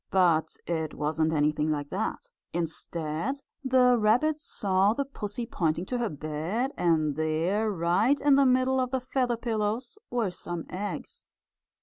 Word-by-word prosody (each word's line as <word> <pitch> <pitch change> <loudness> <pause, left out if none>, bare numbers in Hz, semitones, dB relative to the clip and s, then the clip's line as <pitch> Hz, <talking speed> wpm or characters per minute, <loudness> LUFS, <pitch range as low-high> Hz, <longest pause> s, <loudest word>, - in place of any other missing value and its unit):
But 170 -4 +2
it 160 -2 -2
wasn't 155 +1 0
anything 150 0 +1
like 145 -2 -2
that. - - -3 0.2
Instead 165 - -3 0.2
the 250 -2 +4
rabbit 250 +9 +3
saw 195 -6 +2
the 280 +4 -1
pussy 235 -3 -5
pointing 170 -6 -1
to 245 +4 -2
her 235 -2 0
bed, 155 - -2
and 155 -4 +2
there, 165 +8 0
right 195 +9 +2
in 285 0 +4
the 275 0 +5
middle 255 +1 +3
of 255 -1 0
the 260 0 0
feather 250 -1 0
pillows, 230 - -2
were 230 -6 0
some 175 -2 -5
eggs. 200 +3 -5
200 Hz, 145 wpm, -28 LUFS, 160-250 Hz, 0.2 s, the